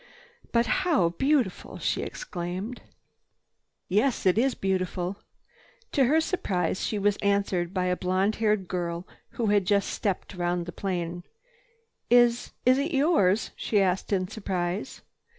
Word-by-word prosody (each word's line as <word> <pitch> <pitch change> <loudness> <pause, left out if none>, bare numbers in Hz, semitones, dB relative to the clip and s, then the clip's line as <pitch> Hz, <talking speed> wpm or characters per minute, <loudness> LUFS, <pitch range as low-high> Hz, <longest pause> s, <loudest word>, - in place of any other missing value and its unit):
"But 235 0 +3 0.2
how 315 - +3
beautiful!" 255 - 0
she - - -1
exclaimed. 185 +6 -5 1.1
"Yes, 215 +7 +1
it 185 - +5
is 255 +4 +2
beautiful." 185 0 -2 0.7
To 270 - +3
her 305 +6 +4
surprise, 190 - -1
she 215 - -1
was 205 0 +2
answered 200 -4 0
by 185 -2 -1
a 180 0 +1
blonde 185 +3 0
haired 210 -4 +1
girl 175 0 -3 0.3
who 235 - 0
had 200 -2 +3
just 200 -1 +2
stepped 200 -1 -2
round 175 -1 -1
the 175 - -6
plane. 175 -2 -3 0.9
"Is—is 245 +2 +3
it 295 +3 -1
yours?" 250 - +3
she 210 - 0
asked 190 0 0
in 185 -2 +1
surprise. 190 0 -3
195 Hz, 135 wpm, -27 LUFS, 180-235 Hz, 1.1 s, it